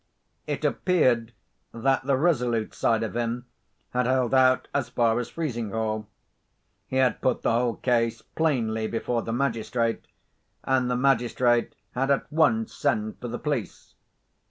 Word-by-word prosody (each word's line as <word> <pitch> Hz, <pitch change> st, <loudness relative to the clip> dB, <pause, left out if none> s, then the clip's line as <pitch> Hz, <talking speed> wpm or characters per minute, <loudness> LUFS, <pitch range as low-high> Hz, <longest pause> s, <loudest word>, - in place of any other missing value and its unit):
It -, -, -2 dB
appeared 125 Hz, -11 st, +2 dB, 0.4 s
that 135 Hz, +3 st, +1 dB
the 135 Hz, -2 st, +3 dB
resolute 125 Hz, -8 st, +1 dB
side 115 Hz, -1 st, +1 dB
of 110 Hz, -1 st, -4 dB
him 120 Hz, +1 st, -2 dB, 0.5 s
had 125 Hz, -1 st, 0 dB
held 130 Hz, -1 st, +1 dB
out 130 Hz, -1 st, +4 dB
as 135 Hz, -4 st, -1 dB
far 120 Hz, -1 st, +2 dB
as 120 Hz, -1 st, -4 dB
Frizinghall. 110 Hz, -7 st, -3 dB, 0.8 s
He -, -, -5 dB
had 130 Hz, -1 st, +2 dB
put 130 Hz, -, 0 dB
the -, -, +2 dB
whole 120 Hz, 0 st, +1 dB
case 115 Hz, -2 st, +1 dB
plainly 115 Hz, -9 st, 0 dB
before 115 Hz, +1 st, -1 dB
the 115 Hz, -, -5 dB
magistrate, 115 Hz, -2 st, -1 dB, 0.6 s
and 130 Hz, -2 st, +1 dB
the 125 Hz, -, +1 dB
magistrate 120 Hz, -2 st, +2 dB, 0.2 s
had 135 Hz, +2 st, -1 dB
at 140 Hz, -, +2 dB
once 225 Hz, +9 st, +2 dB
sent 110 Hz, -7 st, -1 dB
for 125 Hz, -, -4 dB
the 120 Hz, +1 st, -4 dB
police. 140 Hz, -, -4 dB
120 Hz, 145 wpm, -26 LUFS, 115-130 Hz, 0.8 s, out